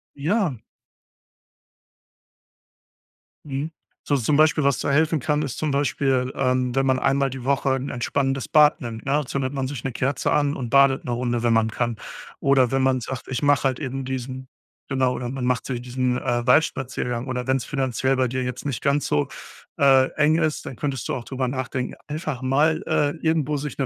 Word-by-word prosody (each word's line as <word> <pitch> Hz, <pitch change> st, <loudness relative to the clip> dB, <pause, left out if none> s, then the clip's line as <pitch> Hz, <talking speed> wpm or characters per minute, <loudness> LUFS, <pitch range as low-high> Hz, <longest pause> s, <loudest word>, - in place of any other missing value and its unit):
Ja. 160 Hz, -, 0 dB, 2.9 s
Mhm. 145 Hz, +3 st, -4 dB, 0.3 s
So 145 Hz, -, +1 dB
so 130 Hz, -, -1 dB
zum 145 Hz, +5 st, +2 dB
Beispiel, 155 Hz, -1 st, +4 dB
was 140 Hz, -3 st, +2 dB
da -, -, -1 dB
helfen 155 Hz, +2 st, +2 dB
kann, 150 Hz, +3 st, 0 dB
ist 140 Hz, -5 st, -4 dB
zum 155 Hz, -, -1 dB
Beispiel, 135 Hz, -2 st, +1 dB
ähm, 125 Hz, -1 st, +1 dB
wenn 135 Hz, 0 st, +2 dB
man 130 Hz, -1 st, +3 dB
einmal 135 Hz, +1 st, +2 dB
die 130 Hz, -1 st, -7 dB
Woche 135 Hz, 0 st, +1 dB
'n 135 Hz, +1 st, -4 dB
entspannendes 135 Hz, +2 st, -1 dB
Bad 150 Hz, 0 st, +5 dB
nimmt, 115 Hz, -2 st, -6 dB
ne? 135 Hz, -, -1 dB
Da 150 Hz, +1 st, +1 dB
zündet 130 Hz, +1 st, -2 dB
man 135 Hz, -1 st, -2 dB
sich 135 Hz, -4 st, -6 dB
'ne 135 Hz, -, -2 dB
Kerze 130 Hz, +3 st, -1 dB
an 145 Hz, -1 st, +2 dB
und 120 Hz, -3 st, -4 dB
badet 140 Hz, 0 st, +4 dB
'ne 125 Hz, -, -3 dB
Runde, 120 Hz, -1 st, -1 dB
wenn 120 Hz, -1 st, +3 dB
man 115 Hz, 0 st, +3 dB
kann. 120 Hz, 0 st, -2 dB, 0.4 s
Oder 135 Hz, -3 st, +3 dB
wenn 135 Hz, 0 st, +1 dB
man 130 Hz, -1 st, +2 dB
sagt: 125 Hz, +2 st, -6 dB
„Ich 130 Hz, +1 st, -3 dB
mache 145 Hz, -2 st, +3 dB
halt 130 Hz, -2 st, +1 dB
eben 135 Hz, -2 st, -4 dB
diesen“ 130 Hz, 0 st, -5 dB, 0.4 s
genau, 130 Hz, -1 st, +2 dB
oder 125 Hz, -1 st, -4 dB
man 130 Hz, -1 st, -3 dB
macht 125 Hz, -1 st, 0 dB
so 130 Hz, -, -2 dB
diesen, 125 Hz, +1 st, -1 dB
äh, 120 Hz, -1 st, -1 dB
Waldspaziergang 125 Hz, -3 st, +1 dB
oder 125 Hz, -1 st, -3 dB
wenn's 130 Hz, -1 st, +1 dB
finanziell 135 Hz, -1 st, 0 dB
bei 130 Hz, -1 st, +1 dB
dir 130 Hz, +2 st, -2 dB
jetzt 125 Hz, +3 st, -5 dB
nicht 140 Hz, -4 st, -3 dB
ganz 140 Hz, 0 st, +1 dB
so, 75 Hz, -, +1 dB, 0.5 s
äh, 135 Hz, -1 st, +5 dB
eng 155 Hz, +2 st, +3 dB
ist, 155 Hz, -2 st, -1 dB
dann 130 Hz, -, -6 dB
könntest 135 Hz, -4 st, -3 dB
du -, -, -2 dB
auch 125 Hz, -, -4 dB
drüber 130 Hz, -1 st, -2 dB
nachdenken, 130 Hz, 0 st, -3 dB
einfach 150 Hz, -3 st, -4 dB
mal, 145 Hz, +5 st, +2 dB
äh, 145 Hz, -1 st, +2 dB
irgendwo 155 Hz, -2 st, +1 dB
sich 145 Hz, +1 st, -5 dB
'ne 135 Hz, -, 0 dB
135 Hz, 200 wpm, -23 LUFS, 125-140 Hz, 2.9 s, Bad